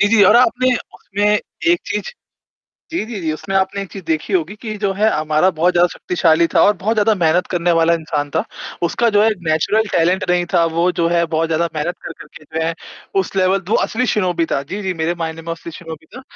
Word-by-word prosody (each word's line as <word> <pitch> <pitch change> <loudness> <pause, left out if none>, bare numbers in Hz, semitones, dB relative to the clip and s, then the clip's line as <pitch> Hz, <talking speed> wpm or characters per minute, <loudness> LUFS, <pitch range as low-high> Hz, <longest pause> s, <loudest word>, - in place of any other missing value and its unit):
जी, 205 - +4
जी, 220 -1 +5
और 215 +5 +6
आपने 250 +1 +3 0.2
उसमें 205 +1 -3 0.5
एक 345 - +3
चीज़ - - -2 0.9
जी, 335 -8 -2
जी, 220 -4 -6
जी, 160 -2 -1
उसमें 195 +5 -6
आपने 190 +1 0
एक 195 - -9
चीज़ 195 -3 -8
देखी 160 +4 -2
होगी 180 +1 0
कि 215 -2 -5
जो 200 -1 0
है, 210 +3 +2
अमारा 155 +3 +2
बहुत 170 +3 +2
ज़्यादा 175 0 +4
शक्तिशाली 170 -2 +2
था - - +5
और 205 - +5
बहुत 215 +5 -1
ज़्यादा 215 +1 +3
मेहनत 175 -1 +2
करने 175 -1 +1
वाला 165 0 +3
इंसान 150 -3 -3
था। - - +1 0.4
उसका 235 +7 +1
जो 205 - +6
है 220 - +4 0.2
नेचुरल 160 +8 +2
टैलेंट 180 +3 +2
नहीं 180 0 +2
था, 170 -1 +4
वो 165 +2 +1
जो 170 -1 0
है 170 0 +2
बहुत 165 0 0
ज़्यादा 165 +1 0
मेहनत 155 +3 -2
कर-कर 165 - -9
के 155 - -19
जो 160 +2 -3
है, 165 +1 -1 0.5
उस 190 - -6
लेवल 190 +1 +3
दो - - +3
असली 250 +3 -1
शिनोबी 180 -7 0
था। 140 - 0
जी, 195 +9 -6
जी, 190 -2 -2
मेरे 170 +2 0
मायने 165 -1 -5
में - - -19
वो - - -1
असली 165 0 -8
शिनोबी 160 -1 -10
था, 260 - -9
175 Hz, 235 wpm, -18 LUFS, 165-205 Hz, 0.9 s, और